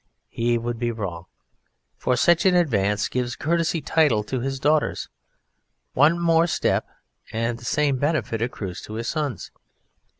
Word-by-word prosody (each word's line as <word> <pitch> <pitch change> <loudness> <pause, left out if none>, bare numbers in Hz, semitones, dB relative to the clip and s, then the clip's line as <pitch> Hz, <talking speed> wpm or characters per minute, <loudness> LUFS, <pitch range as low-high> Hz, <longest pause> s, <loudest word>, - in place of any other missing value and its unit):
He 120 +1 0
would 115 0 -4
be 120 0 0
wrong, 95 -6 -5 0.7
for 125 - 0
such 170 +7 +4
an 185 - +4
advance 105 - +2
gives 125 -1 -2
a - - -23
courtesy 165 +1 0
title 145 -12 +2
to 130 +4 -3
his 135 +2 -3
daughters; 150 +2 +1 0.8
one 150 +5 +4
more 165 0 +3
step - - 0 0.4
and 115 +1 -2
the 120 - -12
same 145 +1 +1
benefit 130 -6 -1
accrues 100 -6 -4
to 110 - -9
his 115 +1 -4
sons. 150 -7 -3
125 Hz, 155 wpm, -24 LUFS, 115-155 Hz, 0.8 s, such